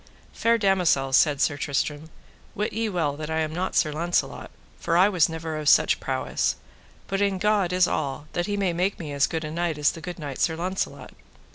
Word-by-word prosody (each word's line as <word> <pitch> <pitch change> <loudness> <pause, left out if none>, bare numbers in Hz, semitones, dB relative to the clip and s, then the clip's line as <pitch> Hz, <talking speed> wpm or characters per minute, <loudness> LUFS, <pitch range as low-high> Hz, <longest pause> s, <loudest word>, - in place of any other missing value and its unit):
Fair 230 0 +2
damosel, 180 -10 +2
said 145 0 +4
Sir 145 +1 +1
Tristram, 145 +2 -2 0.5
wit 210 +2 -2
ye 225 +1 -1
well 160 -7 -1
that 155 0 -6
I 160 0 0
am 155 0 -2
not 185 +3 -3
Sir 155 - +3
Launcelot, 170 +3 -1 0.3
for 165 - +1
I 185 +3 +6
was 180 -7 +3
never 160 -1 -5
of 150 -1 +1
such - - +4
prowess, - - -1 0.5
but 195 +1 -2
in 200 -1 +1
God 200 -2 +1
is 180 0 +3
all 145 -1 -3
that 175 0 -1
he 205 -1 -1
may 190 -3 0
make 185 +4 0
me 150 -4 -6
as 140 -1 +2
good 160 -2 -3
a 155 - -5
knight 170 -1 -1
as 150 0 +3
the 165 - -10
good 180 +2 -6
knight 145 -5 -6
Sir 160 - +1
Launcelot. 185 +3 -4
165 Hz, 215 wpm, -25 LUFS, 150-185 Hz, 0.5 s, I